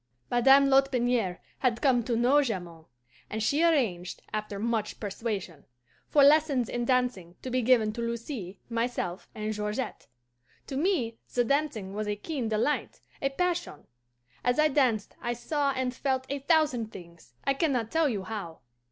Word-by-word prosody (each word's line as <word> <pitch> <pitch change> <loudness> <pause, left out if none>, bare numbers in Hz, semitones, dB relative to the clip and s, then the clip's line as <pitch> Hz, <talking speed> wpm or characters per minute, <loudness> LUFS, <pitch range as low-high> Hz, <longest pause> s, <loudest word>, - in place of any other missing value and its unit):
"Madame 270 +3 +6
Lotbiniere 250 -8 +2 0.2
had 240 -3 +1
come 255 -4 +3
to 235 +1 -1
know 250 +5 +4
Jamond, 175 - -4 0.4
and 220 0 -3
she 285 +7 +2
arranged, 225 - +1
after 210 -1 -3
much 220 0 -2
persuasion, 200 -6 -4 0.5
for 290 - +5
lessons 285 -4 +4
in 240 0 -2
dancing 245 -9 0
to 255 - -4
be 255 +1 +1
given 225 -3 +3
to 235 - -5
Lucy, 230 - -4
myself, 230 -6 -2
and 215 0 -2
Georgette. 210 +3 -4 0.6
To 270 - -6
me 275 -8 0 0.2
the 245 - +4
dancing 240 -7 -1
was 210 +1 -3
a 210 - 0
keen 250 +1 -3
delight, 225 +7 -1 0.2
a 275 - +1
passion. 350 - -2 0.6
As 245 0 +2
I 305 0 +4
danced 250 -8 +1
I 240 - -1
saw 280 +4 -1
and 260 -1 -1
felt 260 0 -1
a 280 +1 -2
thousand 275 -7 +2
things, 170 -8 -13
I 275 - +2
can 310 +2 +1
not 230 -4 -1
tell 325 -2 +3
you 205 -6 -2
how. 185 -5 -6
240 Hz, 160 wpm, -28 LUFS, 210-275 Hz, 0.6 s, Madame